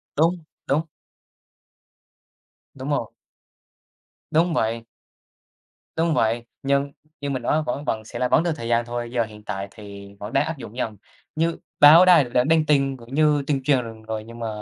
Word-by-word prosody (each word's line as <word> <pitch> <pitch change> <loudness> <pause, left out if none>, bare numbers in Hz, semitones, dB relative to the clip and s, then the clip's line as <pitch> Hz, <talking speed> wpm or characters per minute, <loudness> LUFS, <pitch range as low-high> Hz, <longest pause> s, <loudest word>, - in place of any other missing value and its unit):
Đúng, 165 +2 +1 0.2
đúng. 145 +4 +2 1.9
Đúng 135 +1 -7
rồi. 140 -6 -1 1.2
Đúng 165 +2 +2
vậy. 115 -3 -1 1.1
Đúng 165 0 +2
vậy, 115 -2 +1 0.2
nhưng 140 +1 +1 0.3
như 140 - -3
mình 130 -3 -2
nói 155 +6 +1
vẫn 145 +1 -4
vẫn 110 -1 -2
sẽ - - -7
là 125 - +1
vẫn 155 - +3
được 170 - 0
thời 115 -5 -6
gian 120 0 +2
thôi, 120 0 -4
giờ 120 -2 +1
hiện 105 -1 -11
tại 100 -2 -4
thì 100 -2 -11
vẫn 105 +2 -7
đang 140 +2 +3
áp 160 -2 -4
dụng 120 -2 -10
dần. 110 -4 -3 0.4
Như 165 +1 0 0.2
báo 160 +5 +9
đài 175 -5 +7
đã 125 0 +1
đăng 160 +2 +3
tin 140 -3 +2
cũng 120 +2 -13
như 150 -1 +3
tuyên 140 -3 0
truyền 125 -5 0
rồi, 110 -1 -5
nhưng 115 0 -11
mà 115 - -3
130 Hz, 175 wpm, -23 LUFS, 115-150 Hz, 1.9 s, báo